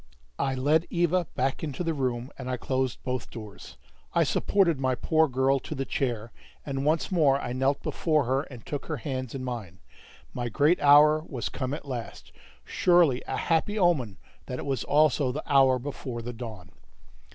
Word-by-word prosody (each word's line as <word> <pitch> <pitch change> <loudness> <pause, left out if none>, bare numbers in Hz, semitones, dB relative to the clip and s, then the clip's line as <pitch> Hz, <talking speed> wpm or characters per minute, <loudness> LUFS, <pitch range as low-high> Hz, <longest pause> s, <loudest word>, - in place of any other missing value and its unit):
I 135 - 0
led 150 +5 +2
Eva 175 0 +1
back 135 +4 -1
into 150 +2 -3
the 165 -1 0
room, 130 -2 -2
and 130 -1 -7
I 125 - -1
closed 130 0 -2
both 125 -2 -3
doors. 105 - -10 0.4
I - - +5
supported 170 -8 +2
my 130 -1 +1
poor 160 +5 +2
girl 135 +1 +2
to 155 - -7
the 135 0 -3
chair, 120 -5 -2 0.3
and 135 -1 -3
once 160 +5 +1
more 145 -6 +3
I 120 - -4
knelt 135 +2 0
before 155 -3 +1
her 130 +2 +1
and 125 -6 -11
took 145 -2 -5
her 155 - -2
hands 130 0 -4
in 130 - -4
mine. 115 -8 -6 0.6
My 120 -1 -3
great 150 +9 +2
hour 150 +2 +6
was 120 -8 -4
come 130 +4 -4
at 150 - -10
last: 125 -4 -7 0.3
surely 175 -8 +3
a - - -2
happy 170 +6 0
omen 145 - +1 0.3
that 125 - -4
it - - -6
was 135 -4 -1
also 145 -2 +3
the 150 +4 -5
hour 135 -2 +4
before 125 -2 -6
the 120 +1 -5
dawn. 110 -6 -9
135 Hz, 185 wpm, -27 LUFS, 125-150 Hz, 0.6 s, hour